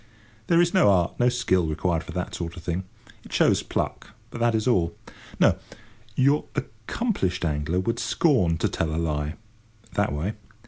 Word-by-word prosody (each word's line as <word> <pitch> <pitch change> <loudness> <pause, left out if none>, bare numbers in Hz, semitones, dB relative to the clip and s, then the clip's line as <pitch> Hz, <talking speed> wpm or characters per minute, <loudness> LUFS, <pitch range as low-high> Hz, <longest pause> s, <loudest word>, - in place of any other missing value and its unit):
There 170 - +4
is 175 0 +3
no 185 - +5
art, 90 -3 +2
no 120 0 +5
skill, 95 -9 +1
required 80 +1 0
for - - -9
that - - -3
sort 85 0 -5
of 85 - -9
thing. 90 +3 -2 0.4
It - - -14
shows - - +3
pluck, 110 - -3 0.2
but 120 - -6
that 120 -1 +3
is 110 +1 0
all. 90 -9 +2 0.4
No; - - +4 0.6
your 140 +4 +3
accomplished 110 - -2
angler 75 +3 0
would 105 +5 -1
scorn 110 - +2
to - - +1
tell 80 -1 -2
a - - -2
lie, 75 -2 -1 0.6
that 100 +2 +1
way. 80 +9 -2
95 Hz, 175 wpm, -25 LUFS, 85-120 Hz, 0.6 s, no